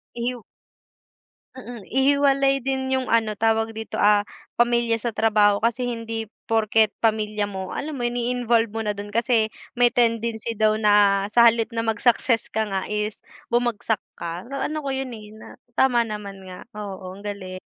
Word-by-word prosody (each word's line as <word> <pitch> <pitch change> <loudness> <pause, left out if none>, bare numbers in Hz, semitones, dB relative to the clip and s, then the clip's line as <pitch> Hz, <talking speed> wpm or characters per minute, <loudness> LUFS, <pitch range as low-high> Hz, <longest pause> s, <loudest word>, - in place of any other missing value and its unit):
Ihiw 240 0 -3 1.2
Mm, 240 -3 -9
ihiwalay 275 0 +3
din 265 0 -1
yung 260 -1 -1
ano 225 -2 +2
tawag 225 +1 +1
dito, 220 0 -6
ah, 205 0 +5 0.3
pamilya 235 -1 +2
sa 235 - -1
trabaho. 210 -2 +3
Kasi, 235 +4 0
hindi 225 -2 -4 0.2
porket 220 -1 +2
pamilya 215 -2 +1
mo, 190 -2 -6
alam 310 +2 -4
mo - - -5
yun 240 0 -1
i-involve 235 -2 +1
mo 225 - -2
na 210 - 0
dun 205 0 -6
kasi 230 -1 +2 0.3
may 245 0 +5
tendency 230 -1 0
daw 215 0 +3
na 205 -2 +4
sa 235 +2 +5
halip 230 0 +4
na 230 0 -1
mag 220 -2 -1
success 235 -1 +2
ka 220 0 -1
nga 195 -2 -2
is 210 0 -3 0.3
bumagsak 235 -3 0 0.2
ka. 170 +1 -5
Naano 295 +3 -3
ko 280 - -4
yun, 265 0 -3
eh, 210 -2 -10
na - - -12 0.3
tama 250 -3 +4
naman 205 -3 -7
nga, 185 -1 -10
oo, 190 -3 -7
ang 195 - -12
galing. 185 -3 -6
225 Hz, 170 wpm, -23 LUFS, 210-240 Hz, 1.2 s, ah